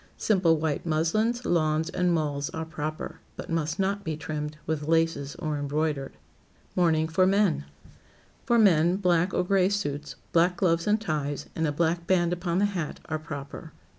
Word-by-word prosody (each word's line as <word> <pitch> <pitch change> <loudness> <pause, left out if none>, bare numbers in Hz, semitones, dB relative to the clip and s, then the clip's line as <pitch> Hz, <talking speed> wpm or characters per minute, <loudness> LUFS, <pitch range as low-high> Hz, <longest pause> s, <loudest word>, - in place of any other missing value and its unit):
Simple 180 -6 +3
white 150 -2 -1
muslins, 215 +10 0
lawns 155 -2 +1
and 180 -1 +1
mulls 145 -4 -1
are 160 0 -3
proper, 155 -1 -5 0.2
but - - -7
must 160 -1 -1
not 200 +1 0
be 160 -4 -3
trimmed 150 -1 -5
with 150 -1 -2
laces 165 -3 +1
or 155 -3 -3
embroidered. 145 -1 -1 0.6
[Sidenote: - - -21
MOURNING 160 -3 +3
FOR 185 +3 +3
MEN] 195 - +2 0.8
For 235 - +2
men, 175 -5 +5
black 180 -2 +2
or 180 - +1
gray 190 0 +3
suits, 150 -8 -3 0.2
black 175 +2 +3
gloves 170 -2 +1
and 210 +1 +3
ties, 150 -7 -2
and 160 -1 0
a - - 0
black 170 +2 0
band 175 -2 +2
upon 175 0 -1
the 200 - +3
hat, 170 -5 -4
are 155 0 -3
proper. 145 -3 -8
165 Hz, 170 wpm, -27 LUFS, 155-180 Hz, 0.8 s, men